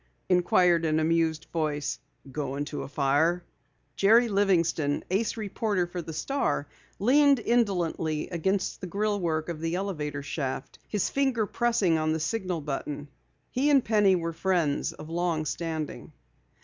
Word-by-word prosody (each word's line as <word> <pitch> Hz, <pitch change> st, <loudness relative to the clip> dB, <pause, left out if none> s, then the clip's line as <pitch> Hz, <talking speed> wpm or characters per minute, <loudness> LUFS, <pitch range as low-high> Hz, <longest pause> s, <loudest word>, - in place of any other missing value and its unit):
inquired 180 Hz, -1 st, +4 dB
an 155 Hz, -1 st, +2 dB
amused 160 Hz, 0 st, +1 dB
voice. 150 Hz, -3 st, -1 dB, 0.3 s
"Going 140 Hz, 0 st, -3 dB
to 145 Hz, -, -5 dB
a -, -, -6 dB
fire?" 145 Hz, +5 st, +1 dB, 0.5 s
Jerry 230 Hz, +4 st, +5 dB
Livingston, 170 Hz, -7 st, +1 dB
ace 210 Hz, +4 st, 0 dB
reporter 205 Hz, -3 st, -1 dB
for 175 Hz, 0 st, -5 dB
the 165 Hz, -, -7 dB
Star, 155 Hz, -, -1 dB, 0.3 s
leaned 280 Hz, +6 st, +5 dB
indolently 180 Hz, -10 st, 0 dB
against 185 Hz, +3 st, -1 dB
the 185 Hz, -, -4 dB
grillwork 180 Hz, -5 st, -1 dB
of 165 Hz, -3 st, -5 dB
the 165 Hz, +1 st, -1 dB
elevator 150 Hz, -7 st, -3 dB
shaft, 135 Hz, -2 st, -4 dB
his 210 Hz, -3 st, -1 dB
finger 265 Hz, -5 st, +1 dB
pressed 235 Hz, +1 st, 0 dB
on 160 Hz, -3 st, +2 dB
the 160 Hz, -, -1 dB
signal 180 Hz, 0 st, -2 dB
button. 145 Hz, 0 st, -4 dB, 0.4 s
He 275 Hz, +4 st, +1 dB
and 275 Hz, -3 st, +4 dB
Penny 210 Hz, -3 st, +4 dB
were 165 Hz, -1 st, -2 dB
friends 170 Hz, -4 st, 0 dB
of 150 Hz, -, -10 dB
long 165 Hz, -1 st, -1 dB
standing. 160 Hz, -2 st, -4 dB
170 Hz, 140 wpm, -27 LUFS, 155-200 Hz, 0.5 s, Jerry